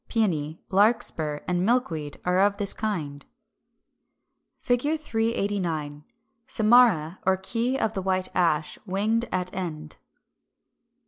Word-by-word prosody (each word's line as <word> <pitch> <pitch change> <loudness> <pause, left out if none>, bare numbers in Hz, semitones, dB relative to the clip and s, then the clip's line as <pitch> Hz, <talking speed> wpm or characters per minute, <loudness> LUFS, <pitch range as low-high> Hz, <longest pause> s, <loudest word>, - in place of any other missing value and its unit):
392), 160 -9 0
Pæony, - - -33
Larkspur, 195 -8 +2
and 180 0 0
Milkweed 175 - -1
are 180 +1 +2
of 200 +1 +3
this 200 -2 0
kind. 155 -10 -4 1.4
[Illustration: 275 +6 +2
Fig. - - -24
389. 195 - -2 0.4
Samara 215 -8 +4
or 190 0 +2
key 235 +7 -1
of 220 -5 0
the 195 - -3
White 185 0 0
Ash, 155 -3 +1
winged 215 +5 +1
at 180 0 -2
end. 155 -4 -5
190 Hz, 120 wpm, -26 LUFS, 160-225 Hz, 1.4 s, Samara